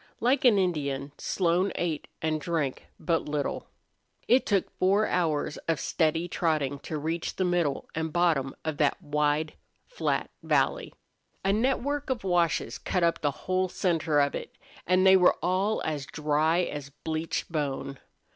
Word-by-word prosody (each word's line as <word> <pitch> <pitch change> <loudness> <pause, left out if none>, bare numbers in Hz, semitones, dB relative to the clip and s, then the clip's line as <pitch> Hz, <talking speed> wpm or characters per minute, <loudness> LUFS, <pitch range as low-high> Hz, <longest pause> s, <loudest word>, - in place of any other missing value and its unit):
Like 255 +3 +2
an 230 -5 +6
Indian, 145 -7 -1
Slone 185 +1 +1
ate 165 -4 -2 0.2
and 155 -1 0
drank 160 -6 -2
but 165 -2 0
little. 145 -1 -2 0.6
It 250 +2 +4
took 200 -3 +1
four 200 +3 +3
hours 155 -4 0
of 165 -3 +1
steady 165 +1 0
trotting 155 -5 0
to 155 - -5
reach 160 +3 -3
the 185 - 0
middle 175 -6 0
and 160 0 -2
bottom 155 -6 +1
of 155 -2 -2
that 145 +4 +2
wide, 150 -1 0 0.3
flat - - -2
valley. - - +1 0.5
A 195 - +3
network 270 +5 0
of 255 -5 -2
washes 175 -4 +1
cut 180 - -1
up 170 0 +2
the 145 - +2 0.2
whole 185 0 +1
center 165 -5 +1
of 140 0 +2
it, - - -7 0.3
and 185 +1 +4
they 190 0 +8
were 180 -1 +5
all 185 +5 0
as 150 -3 -3
dry 155 +3 +1
as 145 -4 -5
bleached 160 +4 -4
bone. 140 -3 -3
165 Hz, 155 wpm, -28 LUFS, 150-185 Hz, 0.6 s, they